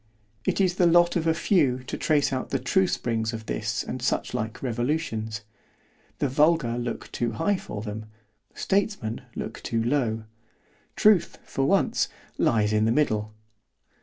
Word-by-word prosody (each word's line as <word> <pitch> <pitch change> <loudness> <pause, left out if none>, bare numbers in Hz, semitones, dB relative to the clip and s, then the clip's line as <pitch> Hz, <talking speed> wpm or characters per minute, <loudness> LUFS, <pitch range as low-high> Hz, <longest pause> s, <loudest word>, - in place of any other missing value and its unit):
It - - 0
is 185 -2 +2
the 175 - +5
lot 175 +1 +5
of 165 -2 0
a 160 - +4
few 145 -8 +2
to - - -5
trace 145 -3 +2
out 130 - -2
the 135 - +1
true 180 +9 +2
springs 115 -6 -1
of 110 -1 -6
this 110 0 -2
and 130 - -5
such - - -1
like 110 +4 -3
revolutions—The 110 -3 -4
vulgar 140 -3 +2
look 120 0 -5
too 120 -2 -1
high 200 - +1
for 105 - -6
them—Statesmen 110 - -3
look - - -5
too 115 -1 -1
low——Truth 115 - 0
(for 135 - -1
once) 195 0 +2 0.3
lies 105 -2 +2
in 110 0 +3
the 110 - +3
middle. 110 -6 0
120 Hz, 145 wpm, -26 LUFS, 110-155 Hz, 0.3 s, the